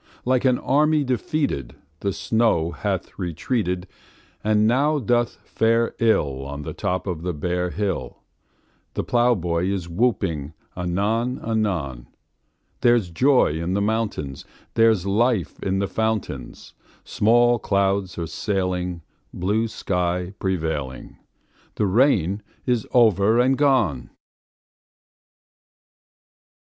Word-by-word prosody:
Like 130 Hz, +1 st, +2 dB
an 125 Hz, -1 st, +4 dB
army 150 Hz, +2 st, +2 dB
defeated 125 Hz, -, -2 dB, 0.2 s
The 100 Hz, -, -1 dB
snow 110 Hz, -6 st, +1 dB
hath 75 Hz, -, -4 dB
retreated, 90 Hz, -, -2 dB, 0.6 s
And 105 Hz, 0 st, +3 dB
now 140 Hz, +7 st, +3 dB
doth 120 Hz, -2 st, +1 dB
fare 115 Hz, +1 st, +1 dB
ill 70 Hz, -, +1 dB
On 70 Hz, +2 st, -6 dB
the -, -, -5 dB
top 90 Hz, +1 st, -2 dB
of 90 Hz, -5 st, -3 dB
the 90 Hz, +1 st, -2 dB
bare 90 Hz, +4 st, -1 dB
hill; 95 Hz, -10 st, -3 dB, 0.7 s
The -, -, -1 dB
plowboy 95 Hz, -8 st, +1 dB
is 95 Hz, -3 st, -2 dB
whooping 85 Hz, -, -1 dB, 0.2 s
anon 105 Hz, +8 st, -1 dB
anon: 90 Hz, -, -2 dB, 0.7 s
There's 120 Hz, -7 st, +3 dB
joy 125 Hz, -, +3 dB
in 90 Hz, +3 st, -1 dB
the 100 Hz, -, +1 dB
mountains; 105 Hz, -10 st, -2 dB, 0.3 s
There's 110 Hz, -5 st, +3 dB
life 105 Hz, -1 st, +1 dB
in 95 Hz, 0 st, 0 dB
the 100 Hz, 0 st, 0 dB
fountains; 110 Hz, -, -3 dB, 0.3 s
Small 120 Hz, +2 st, +3 dB
clouds 100 Hz, -2 st, 0 dB
are 85 Hz, -, -2 dB
sailing, 90 Hz, -1 st, -2 dB, 0.3 s
Blue 105 Hz, +5 st, 0 dB
sky 90 Hz, -3 st, -2 dB
prevailing; 80 Hz, -8 st, -3 dB, 0.6 s
The 105 Hz, -, +1 dB
rain 100 Hz, -, +2 dB, 0.2 s
is 120 Hz, -4 st, 0 dB
over 110 Hz, -2 st, +4 dB
and 130 Hz, +2 st, +4 dB
gone! 120 Hz, -, +2 dB
100 Hz, 110 wpm, -23 LUFS, 85-115 Hz, 0.7 s, an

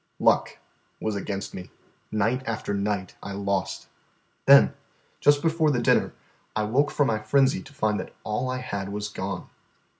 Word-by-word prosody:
Luck -, -, +3 dB, 0.4 s
was 110 Hz, -1 st, -2 dB
against 100 Hz, 0 st, -4 dB
me. 90 Hz, -, -8 dB, 0.4 s
Night 115 Hz, +5 st, +1 dB
after 110 Hz, -2 st, -2 dB
night 100 Hz, -2 st, -1 dB
I 100 Hz, -, -6 dB
lost. 100 Hz, -1 st, -2 dB, 0.6 s
Then, -, -, +8 dB, 0.5 s
just 145 Hz, +1 st, +4 dB
before 160 Hz, -1 st, +3 dB
the 130 Hz, -4 st, +1 dB
dinner, 120 Hz, -, +2 dB, 0.4 s
I 110 Hz, -, +1 dB
woke 135 Hz, +8 st, +2 dB
from 145 Hz, -, +2 dB
my 110 Hz, -4 st, +1 dB
frenzy 135 Hz, +5 st, +2 dB
to 135 Hz, -, -14 dB
find 110 Hz, -7 st, 0 dB, 0.2 s
all 110 Hz, +4 st, -1 dB
that -, -, -1 dB
I -, -, -2 dB
had 100 Hz, -5 st, -4 dB
was 105 Hz, +1 st, -4 dB
gone. 95 Hz, -2 st, -5 dB
105 Hz, 160 wpm, -26 LUFS, 100-130 Hz, 0.6 s, Then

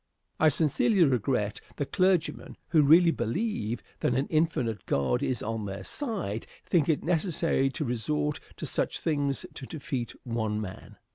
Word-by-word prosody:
I 155 Hz, -, +6 dB
sincerely 165 Hz, -, +3 dB
regret 125 Hz, -6 st, +1 dB
that 145 Hz, -, -4 dB
clergymen 185 Hz, -3 st, +1 dB
who 160 Hz, -, +5 dB
really 165 Hz, +4 st, +7 dB
believe 120 Hz, -, -2 dB, 0.2 s
that 125 Hz, -, +1 dB
an 135 Hz, +2 st, +1 dB
infinite 155 Hz, -9 st, 0 dB
God 65 Hz, -3 st, +1 dB
is 125 Hz, -3 st, -1 dB
on 110 Hz, -1 st, -3 dB
their 95 Hz, 0 st, -5 dB
side 195 Hz, -, -3 dB, 0.2 s
think 165 Hz, -3 st, +2 dB
it 155 Hz, -, +1 dB
necessary 165 Hz, -4 st, +1 dB
to 150 Hz, +3 st, -3 dB
resort 145 Hz, +5 st, -1 dB, 0.2 s
to -, -, -5 dB
such -, -, -1 dB
things 145 Hz, -3 st, -1 dB
to 130 Hz, -, -8 dB
defeat 130 Hz, -6 st, -4 dB
one 110 Hz, -3 st, -1 dB
man. 95 Hz, -3 st, -8 dB
140 Hz, 150 wpm, -28 LUFS, 115-165 Hz, 0.2 s, really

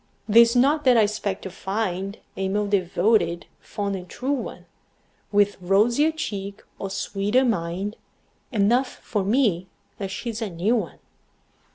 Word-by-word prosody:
'Tis 235 Hz, +2 st, +7 dB
not 285 Hz, +5 st, +3 dB
that 255 Hz, -3 st, +5 dB
I 220 Hz, -, +6 dB
expect 205 Hz, -2 st, -2 dB
to 190 Hz, -, -6 dB
find 195 Hz, 0 st, -3 dB, 0.2 s
A 190 Hz, 0 st, -2 dB
more 205 Hz, +2 st, 0 dB
devoted, 185 Hz, -2 st, +1 dB
fond 200 Hz, -1 st, -4 dB
and 180 Hz, -1 st, -8 dB
true 260 Hz, +2 st, -3 dB
one, 280 Hz, -4 st, -4 dB, 0.7 s
With 205 Hz, -1 st, +2 dB
rosier 230 Hz, -, +3 dB
cheek 200 Hz, -10 st, -5 dB, 0.2 s
or 195 Hz, -, -4 dB
sweeter 205 Hz, +6 st, 0 dB
mind 195 Hz, -1 st, -2 dB, 0.5 s
Enough 240 Hz, +4 st, +3 dB, 0.2 s
for 205 Hz, -4 st, -1 dB
me 200 Hz, -5 st, +1 dB, 0.3 s
that 195 Hz, -2 st, -3 dB
she's 230 Hz, +3 st, -5 dB
a 220 Hz, -, -2 dB
new 185 Hz, +7 st, +1 dB
one. 190 Hz, -10 st, -3 dB
205 Hz, 145 wpm, -24 LUFS, 190-235 Hz, 0.7 s, Tis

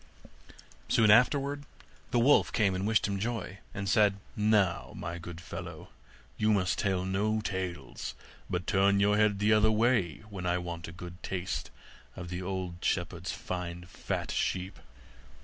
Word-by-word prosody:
Soon 110 Hz, -2 st, +5 dB
afterwards 140 Hz, +5 st, +4 dB, 0.5 s
the -, -, +1 dB
wolf 130 Hz, +5 st, +5 dB
came 100 Hz, -4 st, +2 dB
and 95 Hz, +2 st, -1 dB
wished 110 Hz, -2 st, +3 dB
him 100 Hz, -1 st, -2 dB
joy, 110 Hz, -3 st, -3 dB
and 100 Hz, -1 st, -4 dB
said, 105 Hz, -2 st, +4 dB, 0.2 s
'Now, 105 Hz, -4 st, +2 dB
my 85 Hz, +1 st, -5 dB
good 85 Hz, 0 st, -8 dB
fellow, 80 Hz, -3 st, -8 dB, 0.5 s
you 110 Hz, 0 st, +3 dB
must 95 Hz, -3 st, +1 dB
tell 95 Hz, -3 st, 0 dB
no 105 Hz, +3 st, +1 dB
tales, 95 Hz, -4 st, -4 dB, 0.3 s
but 90 Hz, 0 st, -2 dB
turn 100 Hz, 0 st, +3 dB
your 105 Hz, +1 st, +4 dB
head 105 Hz, -1 st, +3 dB
the 105 Hz, +2 st, +3 dB
other 110 Hz, 0 st, +5 dB
way 110 Hz, -, +2 dB
when 90 Hz, -2 st, -4 dB
I 90 Hz, 0 st, +2 dB
want 85 Hz, -1 st, -5 dB
to 90 Hz, +1 st, -8 dB
taste 90 Hz, -1 st, -3 dB, 0.5 s
one 95 Hz, -, -6 dB
of 90 Hz, -, -8 dB
the 90 Hz, +1 st, -3 dB
old 90 Hz, -2 st, -3 dB
shepherd's -, -, -1 dB
fine 90 Hz, -1 st, -5 dB
fat 90 Hz, -, -4 dB
sheep. 95 Hz, +1 st, -1 dB
95 Hz, 155 wpm, -30 LUFS, 90-105 Hz, 0.5 s, Soon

